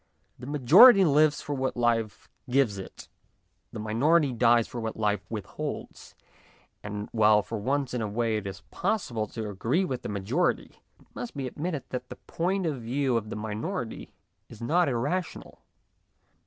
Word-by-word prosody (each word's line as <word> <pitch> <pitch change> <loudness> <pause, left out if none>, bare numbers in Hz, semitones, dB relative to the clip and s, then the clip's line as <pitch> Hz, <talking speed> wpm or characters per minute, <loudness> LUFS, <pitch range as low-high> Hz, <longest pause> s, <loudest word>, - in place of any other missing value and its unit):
The 125 - -9
majority 180 - +7
lives 150 0 +3
for 145 - -4
what 130 -2 -2
life 115 -3 0 0.2
gives 125 -6 +2
it, 95 - -10 0.6
the - - -8
minority 135 +7 +2
dies 120 -1 +3
for 120 - -6
what 110 0 -4
life 105 -2 0
withholds; 110 -4 -6 0.7
and, 105 0 -5
while 105 -2 +4
for 115 +1 -5
once 135 +4 -1
in 125 - -2
a 110 - -1
way 110 +1 -1
it 100 -2 -5
is 95 0 -7
possible 125 - -1
to 110 +1 -6
agree 115 - 0
with 130 -8 -4
the - - -6
majority, 105 - -1 0.2
it - - -23
must 235 -11 -7
be 135 - -3
ad 130 - -8
mitted 160 -3 -2
that 125 0 -5
the - - -7
point 185 +3 -2
of 145 -6 -2
view 130 +2 0
of 110 -2 -2
the - - -5
minority 110 - -5 0.4
is 115 - -12
not 165 +7 +2
irrational. 145 +9 -3
120 Hz, 170 wpm, -27 LUFS, 110-145 Hz, 0.7 s, majority